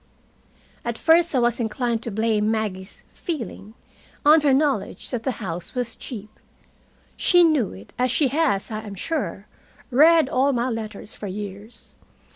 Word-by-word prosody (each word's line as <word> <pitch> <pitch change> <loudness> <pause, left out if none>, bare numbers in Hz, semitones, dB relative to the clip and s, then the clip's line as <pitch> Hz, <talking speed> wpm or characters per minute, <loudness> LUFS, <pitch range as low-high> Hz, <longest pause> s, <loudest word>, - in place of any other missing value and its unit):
At 235 -1 -3
first 330 +1 +4
I - - +4
was 240 -1 +2
inclined 235 0 -1
to 235 - -5
blame 215 0 +1
Maggie's 205 -4 -3
"feeling" 230 - -6 0.5
on 305 +2 +7
her 290 -1 +3
knowledge 280 +1 0
that 245 -3 -2
the 260 +2 -1
house 180 -2 -6
was 245 -2 -2
cheap. 215 -3 -9 0.8
She 355 -1 +4
knew 305 - +3
it, 95 +2 -13
as 250 +1 +2
she 270 +2 +2
has, 275 -9 0
I 215 - -3
am 205 -2 -8
sure, 325 - -3 0.5
read 315 +3 +6
all 270 +2 +2
my 245 +1 0
letters 220 -2 -6
for 205 - -7
years. 205 +3 -8
235 Hz, 155 wpm, -23 LUFS, 210-280 Hz, 0.8 s, on